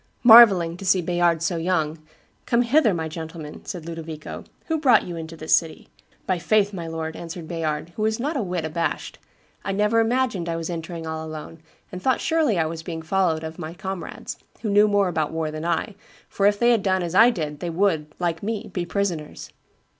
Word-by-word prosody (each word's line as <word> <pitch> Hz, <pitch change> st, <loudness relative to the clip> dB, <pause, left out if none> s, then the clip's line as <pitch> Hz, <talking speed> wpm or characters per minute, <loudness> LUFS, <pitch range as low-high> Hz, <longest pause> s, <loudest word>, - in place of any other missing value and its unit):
"Marvelling 200 Hz, -8 st, +8 dB
to 195 Hz, -, -9 dB
see 185 Hz, 0 st, +3 dB
Bayard 175 Hz, -1 st, +1 dB
so 170 Hz, 0 st, 0 dB
young, 165 Hz, -2 st, -1 dB, 0.5 s
'Come 240 Hz, 0 st, +3 dB
hither, 240 Hz, -1 st, +4 dB
my 165 Hz, -3 st, -2 dB
gentleman,' 160 Hz, -1 st, -8 dB
said 175 Hz, -4 st, -6 dB
Ludovico: 165 Hz, -2 st, -7 dB, 0.2 s
'who 320 Hz, -2 st, -1 dB
brought 275 Hz, -5 st, +5 dB
you 175 Hz, -, -6 dB
into 165 Hz, 0 st, -7 dB
the 155 Hz, -, -9 dB
city?' 160 Hz, -1 st, +1 dB, 0.4 s
'By 185 Hz, -, +1 dB
my 180 Hz, -, -2 dB
faith, 205 Hz, +4 st, +2 dB
my 170 Hz, -3 st, -5 dB
lord,' 160 Hz, 0 st, -4 dB
answered 170 Hz, -1 st, -7 dB
Bayard, 160 Hz, -2 st, -3 dB
who -, -, -5 dB
was 220 Hz, +1 st, 0 dB
not 295 Hz, +6 st, -2 dB
a 270 Hz, -, 0 dB
whit 180 Hz, -5 st, -3 dB
abashed, 165 Hz, +2 st, -3 dB, 0.4 s
'I 195 Hz, -, -2 dB
never 210 Hz, +3 st, +2 dB
imagined 225 Hz, -6 st, 0 dB
I 165 Hz, -, -1 dB
was 165 Hz, +1 st, -4 dB
entering 165 Hz, 0 st, -6 dB
all 160 Hz, 0 st, -4 dB
alone, 155 Hz, +1 st, -8 dB, 0.3 s
and 185 Hz, -, -7 dB
thought 260 Hz, +4 st, +2 dB
surely 315 Hz, -, +1 dB
I 165 Hz, -, +2 dB
was 160 Hz, +1 st, -5 dB
being 165 Hz, -1 st, -6 dB
followed 165 Hz, -2 st, +1 dB
of 160 Hz, +1 st, -7 dB
my 160 Hz, 0 st, -6 dB
comrades, 190 Hz, -2 st, -6 dB, 0.3 s
who 215 Hz, -, -1 dB
knew 205 Hz, +1 st, +5 dB
more 205 Hz, -2 st, +2 dB
about 160 Hz, -4 st, -1 dB
war 160 Hz, -1 st, -2 dB
than 155 Hz, +1 st, -6 dB
I, 170 Hz, +5 st, -1 dB, 0.3 s
for 200 Hz, -, +1 dB
if 205 Hz, 0 st, +2 dB
they 240 Hz, +3 st, +4 dB
had 230 Hz, -3 st, +3 dB
done 190 Hz, -2 st, +1 dB
as 170 Hz, -1 st, -4 dB
I 225 Hz, +5 st, +7 dB
did 155 Hz, -10 st, -4 dB
they 175 Hz, -, -3 dB
would, 165 Hz, -3 st, +1 dB
like 170 Hz, -2 st, -2 dB
me, 220 Hz, +1 st, -4 dB
be 175 Hz, -2 st, -3 dB
prisoners. 175 Hz, -5 st, -3 dB
175 Hz, 210 wpm, -23 LUFS, 160-205 Hz, 0.5 s, Marvelling